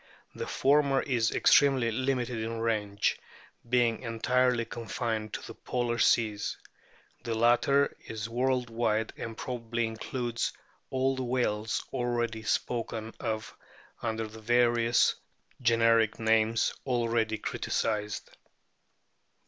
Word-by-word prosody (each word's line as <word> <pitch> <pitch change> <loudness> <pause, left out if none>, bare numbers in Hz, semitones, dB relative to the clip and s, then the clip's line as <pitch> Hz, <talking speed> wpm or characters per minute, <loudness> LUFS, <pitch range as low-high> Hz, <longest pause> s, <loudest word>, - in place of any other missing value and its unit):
The - - -5
former 140 0 +3
is 120 -5 +1
extremely 135 -5 +4
limited 125 -1 -1
in 115 +1 -3
range, 105 -3 0 0.5
being 120 -2 +2
entirely 125 +1 +1
confined 115 -2 -3
to - - -5
the - - -8
polar 120 -1 -2
seas; 110 -4 +2 0.7
the 115 -1 -2
latter 120 +5 +3
is 110 -1 -4
world 125 +1 0
wide, 115 -1 0
and 115 -1 -6
probably 120 -2 -2
includes 115 +1 -3 0.4
all 130 0 +1
the 130 - -3
whales 115 -4 -1
already 120 -3 -1
spoken 115 0 -2
of 110 -1 -3 0.5
under 115 -1 -2
the 110 +1 -11
various 120 0 +3 0.5
generic 115 -2 +3
names 110 0 +2
already 115 -3 +1
criticised. 105 -1 -2
115 Hz, 110 wpm, -29 LUFS, 110-125 Hz, 0.7 s, extremely